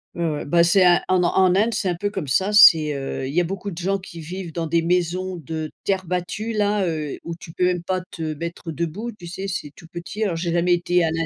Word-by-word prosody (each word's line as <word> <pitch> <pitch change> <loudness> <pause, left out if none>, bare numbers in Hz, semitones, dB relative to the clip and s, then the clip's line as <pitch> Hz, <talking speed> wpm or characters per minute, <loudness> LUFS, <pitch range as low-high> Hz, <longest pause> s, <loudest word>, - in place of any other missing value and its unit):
Ouais, 170 - -2
ouais, 150 - -4
bah, 170 +4 +4
c'est 180 +3 +4
un 175 0 +6
en 185 -1 +3
en 185 +1 +3
Inde, 220 +4 +2
c'est 190 - 0
un 175 - 0
peu 205 +4 -2
comme 190 -7 -5
ça, 190 +9 +2
c'est 160 -7 +8
heu, 135 -1 -4
il 135 - -5
y 175 - +3
a - - +1
beaucoup 195 +3 -4
de 165 - -9
gens 195 +3 -1
qui 170 -2 -11
vivent 175 +2 -6
dans 165 0 -2
des 165 +1 +1
maisons 180 +2 0
de 160 -1 -5
terre 190 -1 0
battue, 180 +6 -3
là, 205 -2 +1
heu, 155 -3 -3
où 170 0 -5
tu 165 - -11
peux 180 - 0
même 180 -1 0
pas 185 +1 -1
te 160 -2 -4
mettre 170 +2 -6
debout, 170 +9 -4
tu 180 -5 -12
sais? 190 +3 -5
C'est 180 -6 -4
tout - - -14
petit. 175 +6 -5
Alors, 185 -5 0
j'ai 170 0 -2
jamais 175 +1 +3
été 175 0 +2
à 160 - +1
l'int 165 0 -1
175 Hz, 265 wpm, -22 LUFS, 165-190 Hz, -, c'est